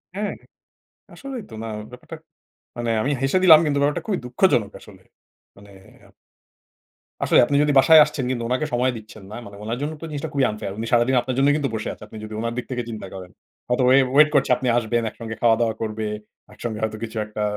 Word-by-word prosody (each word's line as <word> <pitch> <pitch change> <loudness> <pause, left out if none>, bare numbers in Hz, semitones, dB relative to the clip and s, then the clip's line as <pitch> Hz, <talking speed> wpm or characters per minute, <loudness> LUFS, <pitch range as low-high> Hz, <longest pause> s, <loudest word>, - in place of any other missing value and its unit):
হ্যাঁ। 205 +1 -2 0.8
আসলেই 265 -5 -7
তো - - -13
না 115 - -5 0.2
ব্যাপারটা 125 +6 -10 0.6
মানে 120 -1 -2
আমি 140 - -1
হেসে 135 +7 +2
দিলাম 160 -4 +9
কিন্তু 145 -2 0
ব্যাপারটা 145 +1 0
খুবই 195 -4 -1
দুঃখজনক 125 - +1
আসলে। - - -16 0.5
মানে 100 0 -16 0.4
আপ - - -25 1.1
আসলে - - +4
আপনি 140 - -1
যদি 150 -1 +1
বাসায় 155 +4 +8
আসছেন 145 -3 -4
কিন্তু 120 -2 -2
উনাকে 130 +5 0
সময় 125 +1 +2
দিচ্ছেন 110 -1 -13
না। - - -7
মানে 100 0 -11
ওনার 115 +3 -3
জন্য 150 +2 -3
তো 165 - -5
জিনিসটা 145 -2 -4
খুবই 140 -2 +2
unfair. 105 -2 -6
উনি 115 - -4
সারাদিন 120 +2 +3
আপনার 125 +1 -4
জন্যই 140 +2 +4
কিন্তু 140 -3 -1
বসে 105 - -4
আছেন, 105 - -12
আপনি 110 - -11
যদি 110 0 -8
উনার 115 +1 -2
দিক 125 - -3
থেকে 125 -1 -2
চিন্তা 110 -4 -7
করেন। 95 -2 -9 0.4
হয়তোবা 125 +1 +2
ওয়ে 130 +1 +6 0.2
ওয়েট 150 +1 +7
করছেন 130 -2 +3
আপনি 130 - -4
আসবেন, 120 0 0
একসঙ্গে 110 0 -8
খাওয়া-দাওয়া 115 -1 +3
করবে। 110 0 -3 0.5
একসঙ্গে 110 -1 -5
হয়তো 110 0 -2
কিছু 110 0 -6
একটা 105 0 -5
120 Hz, 205 wpm, -22 LUFS, 110-145 Hz, 1.1 s, দিলাম